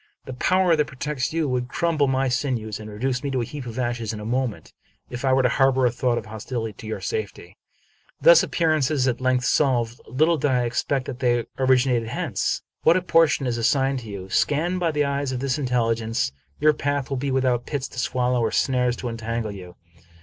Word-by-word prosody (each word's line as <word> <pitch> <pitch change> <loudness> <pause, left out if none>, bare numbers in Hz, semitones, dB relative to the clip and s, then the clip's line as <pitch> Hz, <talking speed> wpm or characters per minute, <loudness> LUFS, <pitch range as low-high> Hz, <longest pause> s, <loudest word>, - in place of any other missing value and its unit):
The 130 - -6
power 185 +6 +3
that 150 -1 +1
protects 135 +1 -3
you 160 -1 0
would 125 -1 -1
crumble 155 -1 +1
my 135 0 +1
sinews 125 -5 -2
and 110 0 -8
reduce 125 +5 -2
me 140 - -2
to 130 -2 -1
a - - -2
heap 140 0 -7
of 115 0 -7
ashes 120 -3 -2
in 110 - -6
a 105 - -7
moment, 125 -1 -2 0.4
if 120 +1 -6
I 135 - +2
were 130 0 +3
to - - +5
harbor 135 +1 +3
a 120 - +3
thought 120 -2 -1
hostile 110 +1 -5
to 110 - -11
your 110 - -4
safety. 445 -1 -5 0.3
" - - -36
Thus - - +8
are - - -2
appearances 155 -5 +1
at 125 0 -1
length 130 -1 +1
solved. 120 -4 +1
Little 155 +7 +2
did 145 - +1
I 125 -2 +2
ex 120 0 0
pect 135 -2 -1
that 125 - -6
they 120 -2 +1
originated 125 -3 +2
hence. - - -2 0.2
What 165 +3 +5
a 185 - -2
portion 165 -5 +3
is 120 -2 -1
assigned 135 +3 +2
to 115 -3 -10
you! 95 -2 -7
Scanned 170 +5 +1
by 175 -2 +1
the 150 -2 +1
eyes 140 -1 -1
of 130 - -3
this 135 +2 -1
intelligence, 115 - 0 0.3
your 155 0 +5
path 145 -2 -2
will 135 - 0
be 140 +2 -2
without 130 -2 +1
pits 140 -3 -3
to 130 - -7
swallow 125 0 0
or 115 - +1
snares 125 +1 +1
to 125 - -5
entangle 115 -1 -3
you. 90 -3 -10
130 Hz, 220 wpm, -23 LUFS, 120-140 Hz, 0.4 s, Thus